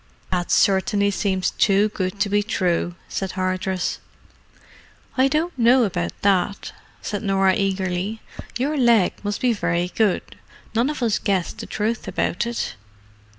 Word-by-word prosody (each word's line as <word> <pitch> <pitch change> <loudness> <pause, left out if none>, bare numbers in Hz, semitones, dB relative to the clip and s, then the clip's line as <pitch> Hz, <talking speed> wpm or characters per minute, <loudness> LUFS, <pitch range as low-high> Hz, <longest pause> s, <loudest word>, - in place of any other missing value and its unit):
"That 180 -1 -1
certainly 200 +1 +3
seems 190 -2 0
too 200 +1 +3
good 190 -1 -3
to - - +3
be 205 +1 +2
true," 180 -4 -1
said 190 -1 -4
Hardress. 185 0 -1 1.2
"I 260 0 +4
don't 315 +5 0
know 245 +2 +5
about 85 - -2
that," 200 0 +1 0.3
said 205 - -3
Norah 195 -2 +3
eagerly. 190 +1 -1 0.4
"Your 285 +5 -1
leg 235 -7 +4
must 205 0 -3
be 250 -2 +3
very 175 -4 -1
good—none 225 +4 -2
of 300 -4 -3
us 225 -4 +1
guessed 190 -4 -1
the - - -6
truth 220 +1 -2
about 180 +3 -1
it. 235 0 -3
200 Hz, 140 wpm, -22 LUFS, 185-225 Hz, 1.2 s, know